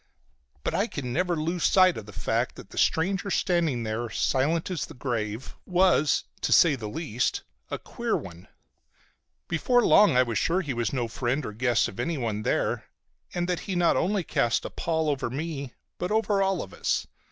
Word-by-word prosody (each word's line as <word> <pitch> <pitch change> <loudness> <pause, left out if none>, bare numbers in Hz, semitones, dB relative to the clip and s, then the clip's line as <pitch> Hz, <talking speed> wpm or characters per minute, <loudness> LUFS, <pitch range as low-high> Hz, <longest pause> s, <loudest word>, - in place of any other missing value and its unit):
But - - -1
I 205 - +1
could 140 - -6
never 175 +8 0
lose 165 +2 -2
sight 185 -2 +5
of 105 - -8
the - - -9
fact 95 -1 -1
that - - -12
the - - -11
stranger 190 +4 +1
standing 170 - +1
there, 110 +2 -3
silent 155 - 0
as 175 - -2
the - - -12
grave, 115 -2 -3
was, 180 -5 +3 0.2
to - - -1
say 165 -4 +6
the 110 -6 -5
least, 125 -3 -2 0.3
a - - -2
queer - - -2
one. 85 -1 -10 1.0
Before 245 +9 +2
long 205 -11 +6
I 130 - +6
was 115 -3 -1
sure 180 +3 +1
he 145 -7 -3
was 120 -2 -1
no 125 -4 -1
friend 125 +4 -2
or 105 - -5
guest 120 +1 +2
of 95 - -10
anyone 120 -11 -1
there, - - 0 0.5
and 175 0 0
that 180 -2 0
he 190 - -1
not 175 -1 +3
only 195 +1 +1
cast 120 -6 0
a - - -5
pall 160 -1 -1
over 140 -4 -1
me 140 -1 -5 0.2
but 180 - -2
over 210 -2 +2
all 195 -3 +1
of 95 - -12
us. - - -1
150 Hz, 190 wpm, -27 LUFS, 120-180 Hz, 1.0 s, say